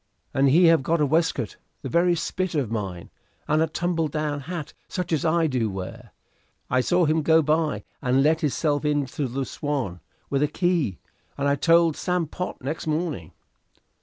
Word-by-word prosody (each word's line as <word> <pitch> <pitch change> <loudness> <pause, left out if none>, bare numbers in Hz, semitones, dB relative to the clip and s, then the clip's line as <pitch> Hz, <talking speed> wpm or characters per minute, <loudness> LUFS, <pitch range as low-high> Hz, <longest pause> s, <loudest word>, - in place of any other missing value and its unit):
"And 135 +1 +3
he 170 +6 +6
have 165 -3 +6
got 165 +5 0
a 150 - +3
waistcoat 150 - 0 0.3
the - - -3
very 175 +1 +3
spit 185 +1 -2
of 135 -7 -1
mine, 95 -6 -4 0.4
and 155 +1 +2
a 160 - +3
tumble 165 0 -1
down 150 -1 -2
hat 160 +1 -6
such 180 -3 -3
as 155 - +1
I 165 +1 +3
do 125 -7 0
wear. 105 +4 -7 0.6
I 130 +1 +3
saw 175 +6 +2
him 155 +1 +2
go 160 +1 +4
by 155 +1 0 0.2
and 130 +2 +2
let 155 +2 +3
hisself 145 0 0
into 145 -2 -1
the 130 +2 -3
'Swan' 130 - -3 0.3
with 140 0 0
a 150 - +3
key, 165 - 0 0.4
and 140 0 0
I 140 - +3
told 165 +2 +4
Sam 180 -2 -1
Pott 180 -2 -6
next 150 +4 -4
morning." 155 - -2
150 Hz, 180 wpm, -25 LUFS, 135-165 Hz, 0.6 s, he